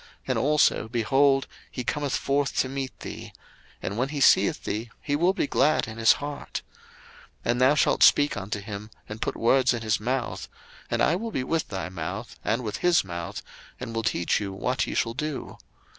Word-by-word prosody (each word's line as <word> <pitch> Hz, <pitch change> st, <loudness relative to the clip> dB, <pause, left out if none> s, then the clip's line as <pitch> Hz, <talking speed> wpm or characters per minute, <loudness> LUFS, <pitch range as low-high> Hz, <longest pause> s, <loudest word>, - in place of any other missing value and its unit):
And -, -, +1 dB
also, 150 Hz, -5 st, +3 dB
behold, 135 Hz, +4 st, +3 dB, 0.2 s
he 125 Hz, -, -5 dB
cometh 145 Hz, +2 st, -1 dB
forth 140 Hz, 0 st, 0 dB
to -, -, +2 dB
meet 135 Hz, -2 st, -5 dB
thee: -, -, -7 dB, 0.5 s
and 100 Hz, +4 st, -3 dB
when 130 Hz, +2 st, 0 dB
he 150 Hz, -1 st, -4 dB
seeth -, -, +4 dB
thee, 110 Hz, +3 st, -3 dB
he 145 Hz, -, -1 dB
will 175 Hz, +5 st, +3 dB
be 195 Hz, -, -1 dB
glad 155 Hz, +2 st, +2 dB
in 110 Hz, 0 st, -8 dB
his 115 Hz, -, +6 dB
heart. 145 Hz, 0 st, -6 dB, 0.8 s
02:004:015 -, -, +3 dB
And 120 Hz, +1 st, -1 dB
thou 130 Hz, +3 st, +5 dB
shalt -, -, +2 dB
speak 145 Hz, 0 st, +6 dB
unto 105 Hz, 0 st, -4 dB
him, 105 Hz, 0 st, -7 dB, 0.2 s
and 105 Hz, +1 st, -8 dB
put -, -, -1 dB
words 130 Hz, +1 st, +3 dB
in 115 Hz, -, -5 dB
his 110 Hz, -2 st, +1 dB
mouth: 125 Hz, +3 st, -2 dB, 0.4 s
and -, -, +1 dB
I 160 Hz, -, +3 dB
will 225 Hz, +5 st, -3 dB
be 135 Hz, -12 st, -2 dB
with 160 Hz, +5 st, -1 dB
thy 95 Hz, -2 st, -4 dB
mouth, 85 Hz, -4 st, -5 dB
and 115 Hz, +4 st, 0 dB
with 105 Hz, -2 st, -3 dB
his 175 Hz, -1 st, +3 dB
mouth, 85 Hz, -2 st, -6 dB, 0.4 s
and 125 Hz, -2 st, -6 dB
will 115 Hz, -, -1 dB
teach 95 Hz, -6 st, +1 dB
you 100 Hz, -1 st, -3 dB
what 95 Hz, -, -1 dB
ye -, -, -4 dB
shall 115 Hz, -, 0 dB
do. 150 Hz, +2 st, -5 dB
125 Hz, 200 wpm, -26 LUFS, 110-145 Hz, 0.8 s, his